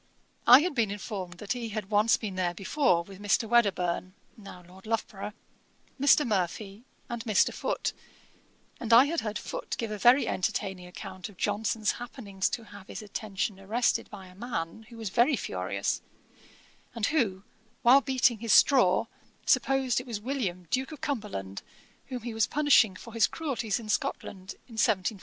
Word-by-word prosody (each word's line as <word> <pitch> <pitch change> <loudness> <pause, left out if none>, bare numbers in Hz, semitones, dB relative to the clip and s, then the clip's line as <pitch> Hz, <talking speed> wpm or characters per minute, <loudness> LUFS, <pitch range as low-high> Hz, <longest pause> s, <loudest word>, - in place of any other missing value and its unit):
I 250 +3 +10
had 355 +1 -1
been 230 -6 +1
informed 195 -3 -5
that 200 +3 -7
he 240 -2 -5
had 215 -1 -5
once 210 +2 +4
been 210 -4 -5
there 180 -2 -1
before 195 - +1
with 195 +2 -13
Mr. 210 +2 +1
Wedderburne, 185 -5 +1 0.2
(now 195 -4 -12
Lord 190 +3 -15
Loughborough,) 215 -2 -3 0.7
Mr. 285 +2 +5
Murphy, 200 +1 -2 0.2
and 235 -2 -5
Mr. 215 -4 +3
Foote; - - -2 0.9
and 235 -2 0
I 245 +4 +9
had 330 +3 -1
heard 215 -1 -3
Foote - - -5
give 225 -2 -3
a 210 - -4
very 245 +6 +5
entertaining 185 -1 -2
account 185 0 -8
of 200 - -17
Johnson's 215 +1 0
happening 225 -5 -9
to 225 +4 0
have 205 -2 -13
his - - -7
attention 200 -1 -4
arrested 220 +5 0
by 195 -3 -10
a 180 - -15
man 210 -1 -5
who 235 - -12
was 220 -4 -5
very 245 +7 +4
furious, 95 - -2 0.9
and 225 -2 0
who, 220 -11 0 0.4
while 260 +4 +7
beating 260 -4 +2
his 230 -2 +1
straw, 245 -7 +5 0.4
supposed 265 -3 +2
it 255 - -14
was 225 -4 -4
William 210 -8 -3
Duke 265 +3 0
of 305 - -10
Cumberland, 200 - -4 0.5
whom 250 -3 -6
he 235 -1 -4
was 225 0 +2
punishing 285 -9 +4
for 230 +4 -11
his 225 -3 +4
cruelties 250 -9 -2
in 225 - -9
Scotland, 190 -2 -3
in 225 -3 -2
1746. 205 -1 +1
215 Hz, 170 wpm, -28 LUFS, 190-245 Hz, 0.9 s, I